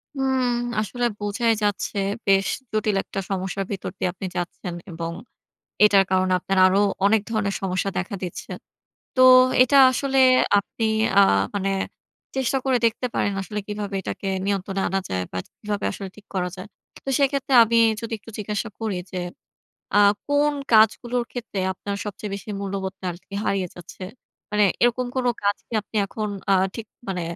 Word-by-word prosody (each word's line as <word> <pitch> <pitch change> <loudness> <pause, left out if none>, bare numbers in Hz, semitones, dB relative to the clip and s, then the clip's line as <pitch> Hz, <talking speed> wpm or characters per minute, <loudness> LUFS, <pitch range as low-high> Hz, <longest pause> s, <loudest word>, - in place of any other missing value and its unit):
হুম। 265 -1 +1 0.4
আসলে 240 +4 -2
বোঝাই 205 +3 +1
যাচ্ছে 205 0 -1 0.3
বেশ 195 0 +3 0.2
জটিল 215 -1 0
একটা - - -5
সমস্যার 195 0 -2
ভিতর 195 - -4
দিয়ে 180 - 0
আপনি 190 - -7
যাচ্ছেন। 175 0 -4 0.2
এবং 165 0 -4 0.7
এটার 200 -2 +6
কারণে 185 0 +2
আপনার 195 +2 -2
আরো 185 +1 +4 0.3
অনেক 215 0 +4
ধরনের 205 -3 -1
সমস্যা 190 +1 -1
দেখা 185 +2 -3
দিচ্ছে। 180 - -6 0.6
তো, 255 - +3 0.4
এটা 275 +2 +5
আসলে 270 +2 -1 0.4
আপনি 225 +3 -4 0.3
আ - - +9 0.3
মানে 195 -1 0 0.7
চেষ্টা 265 0 +1
করে 260 -2 +3
দেখতে 230 +2 0
পারেন 205 - 0
আসলে 210 +2 -4
কীভাবে 205 -1 -4
এটাকে 195 - -5 0.2
নিয়ন্ত্রণে 195 -1 -1
আনা 195 +2 0
যায় 90 0 -1
বা, 90 - -4 0.2
কিভাবে 205 -1 -3
আসলে 195 -1 -7
ঠিক 210 - -16
করা 180 -1 0
যায়। 185 +3 -8 0.4
তো - - -2
সেক্ষেত্রে 275 -1 +1
আমি 230 +1 +1 0.2
যদি 230 0 -5
একটু 225 +2 -13
জিজ্ঞাসা 210 +2 -3
করি 220 -4 -2 0.2
যে, 185 - -4 0.8
আ - - +7 0.3
কোন 290 +1 +3 0.2
কাজগুলোর 235 +3 +4
ক্ষেত্রে 235 -5 -5
আপনার 200 +2 -5
সবচেয়ে 205 0 -6
বেশি 200 +2 -7
মূল্যবোধটা 190 -1 -5
আরকি 175 +3 -16
হারিয়ে 195 -2 0
যাচ্ছে? 175 +1 -12 0.5
মানে 210 0 +3 0.2
এরকম 245 +1 +2
কোন 255 -1 0 0.2
কাজ 200 0 +2
কি - - -20
আপনি 215 - -9
এখন 215 +2 -4 0.2
আ - - +6 0.2
ঠিক 225 -1 -6 0.2
মানে 180 -2 -2
205 Hz, 160 wpm, -23 LUFS, 195-230 Hz, 0.8 s, আ